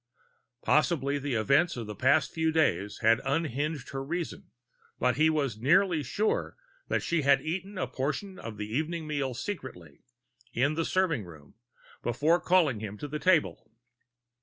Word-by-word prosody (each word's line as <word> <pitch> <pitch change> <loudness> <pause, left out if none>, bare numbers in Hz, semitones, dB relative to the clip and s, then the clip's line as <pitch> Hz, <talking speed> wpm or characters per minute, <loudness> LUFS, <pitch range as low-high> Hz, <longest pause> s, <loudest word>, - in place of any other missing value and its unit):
Possibly 145 -3 +2
the 140 -2 -2
events 140 +9 +2
of 115 - -4
the 105 - -6
past 140 +7 +2
few 160 0 +1
days 105 - 0
had 115 +3 +4
unhinged 150 -1 -2
her 135 0 -4
reason, 170 +4 -5 0.5
but 125 -1 +1
he 155 +1 +5
was 140 -8 -1
nearly 175 +4 +3
sure 205 - -1 0.3
that - - 0
she 170 -2 +1
had 140 -1 +4
eaten 190 +5 -4
a - - 0
portion 170 +8 -4
of 110 -2 -7
the 105 - -4
evening 155 +9 -2
meal 140 -4 -2
secretly, 120 - -7 0.5
in 140 +5 +2
the 165 +1 -1
serving 165 - +1
room, 75 -4 -14 0.5
before 150 +8 +2
calling 165 - +3
him 105 -1 -6
to 145 - -6
the 150 +1 -4
table. 165 -9 +1
145 Hz, 160 wpm, -29 LUFS, 120-165 Hz, 0.5 s, he